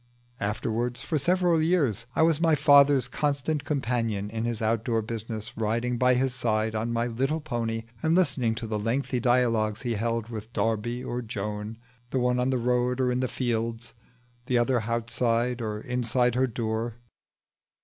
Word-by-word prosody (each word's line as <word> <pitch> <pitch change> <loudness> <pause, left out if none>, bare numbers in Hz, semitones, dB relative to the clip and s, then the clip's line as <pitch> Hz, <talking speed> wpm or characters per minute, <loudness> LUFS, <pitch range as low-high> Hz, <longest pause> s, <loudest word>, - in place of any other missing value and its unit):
Afterwards 115 +4 -2
for 155 -3 -1
several 175 +1 +2
years 145 - +1
I - - +4
was 165 -1 +3
my 165 -2 +4
father's 140 -3 +5
constant 145 +2 -1
companion 115 -7 -1
in 115 0 -2
his 120 -2 -2
outdoor 115 0 0
business, 110 0 -6
riding 115 +2 -1
by 125 0 +4
his 130 0 +1
side 110 -3 0
on 110 +2 -2
my 115 0 0
little 135 +7 -1
pony 115 -6 -3 0.2
and 160 +1 +2
listening 130 -11 +2
to 115 - -5
the 110 -1 -2
lengthy 125 +4 -1
dialogues 115 -3 +2
he 120 -2 -1
held 115 +1 -2
with 110 -1 -7
Darby 115 +2 -1
or 120 +1 -3
Joan, 105 0 -5 0.3
the 135 - -2
one 125 0 +2
on 125 +1 +1
the 130 - +1
road 125 +1 +1
or 125 -1 +2
in 125 - 0
the 130 - 0
fields, 115 -1 -2 0.5
the 125 - +2
other 120 0 +2
outside 115 +1 0
or 105 -2 -3
inside 125 0 +1
her 130 +2 +2
door. 115 -1 -3
120 Hz, 170 wpm, -27 LUFS, 115-130 Hz, 0.5 s, father's